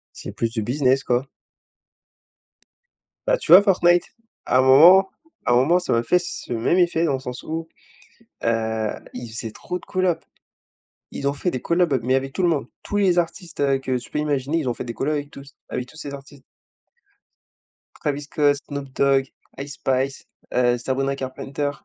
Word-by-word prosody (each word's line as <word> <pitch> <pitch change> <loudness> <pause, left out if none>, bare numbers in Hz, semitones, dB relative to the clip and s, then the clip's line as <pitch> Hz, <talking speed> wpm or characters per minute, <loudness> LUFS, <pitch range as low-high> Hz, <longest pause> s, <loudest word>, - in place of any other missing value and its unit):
C'est - - -8
plus 115 - -2
du 115 -1 -3
business, 130 +3 +1
quoi. 125 +2 0 2.0
Bah - - +3
tu - - 0
vois 185 +3 +11
Fortnite, 175 -3 +4 0.4
à 125 - +3
un 130 - +5
moment 175 +9 +7 0.3
à - - +2
un - - +5
moment 160 +8 +4
ça 180 - -3
m'a 115 - +2
fait 180 +9 +3
ce 175 -7 -6
même 120 +10 +1
effet 170 -2 +2
dans 150 -5 +1
le - - -1
sens 125 -1 -7
où, 160 +1 -5 0.8
heu, 110 -1 0 0.3
ils 125 -2 -7
faisaient 115 0 -5
trop 180 +9 -5
de - - -17
collabs. 180 -3 0 0.9
Ils 140 - -5
ont 140 - +2
fait 145 +5 -2
des 130 - -4
collabs, 170 -6 +2
mais 130 +3 +1
avec 135 0 -1
tout 185 - -2
le 175 - +4
monde, 145 -7 0 0.2
tous 205 - -4
les 185 -3 +3
artistes, 175 -1 -3
heu, 140 -1 +2
que 130 -1 -2
tu 125 - -12
peux - - -2
imaginer, 145 +1 0
ils 145 -6 -2
ont 120 - -1
fait - - -6
des 115 - -6
collabs, 150 +6 -1
avec 145 0 -5
tous 140 0 -13 0.2
avec 125 - -3
tous 160 - -16
ces 145 -3 -7
artistes 140 -1 -13 1.5
Travis 145 -1 -3
Scott, 145 0 +2
Snoop 140 -2 -6
Dog, 135 -1 +3 0.3
Ice 140 +1 -6
Spice, 135 +1 -1 0.3
heu, 120 -1 +3
Sabrina 135 +3 -1
Carpenter, 135 +2 -4
140 Hz, 190 wpm, -22 LUFS, 130-165 Hz, 2.0 s, vois